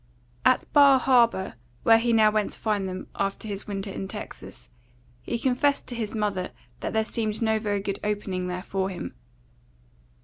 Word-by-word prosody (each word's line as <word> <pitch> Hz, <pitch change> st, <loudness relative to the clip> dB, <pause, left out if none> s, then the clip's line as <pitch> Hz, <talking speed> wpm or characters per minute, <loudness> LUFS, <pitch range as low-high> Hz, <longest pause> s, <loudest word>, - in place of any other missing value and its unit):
At -, -, +4 dB
Bar 280 Hz, -2 st, +8 dB
Harbour, 235 Hz, -7 st, +3 dB, 0.3 s
where 225 Hz, 0 st, +7 dB
he 235 Hz, +1 st, +1 dB
now 220 Hz, -2 st, +5 dB
went 215 Hz, -1 st, 0 dB
to -, -, -10 dB
find 205 Hz, -3 st, 0 dB
them, 185 Hz, 0 st, -5 dB
after 200 Hz, +2 st, -2 dB
his 200 Hz, -1 st, -5 dB
winter 195 Hz, -1 st, -4 dB
in 195 Hz, -, -5 dB
Texas, -, -, -8 dB, 0.5 s
he 235 Hz, -, -2 dB
confessed 265 Hz, +4 st, +1 dB
to 245 Hz, -, -4 dB
his 225 Hz, -2 st, -3 dB
mother 205 Hz, -4 st, -1 dB, 0.3 s
that -, -, -4 dB
there 220 Hz, 0 st, +2 dB
seemed 220 Hz, -1 st, -1 dB
no 220 Hz, -2 st, +2 dB
very 205 Hz, -2 st, -1 dB
good 200 Hz, 0 st, -3 dB
opening 200 Hz, -3 st, -2 dB
there 180 Hz, 0 st, -4 dB
for 195 Hz, -1 st, -1 dB
him. 175 Hz, -, -6 dB
210 Hz, 175 wpm, -26 LUFS, 195-230 Hz, 0.5 s, Bar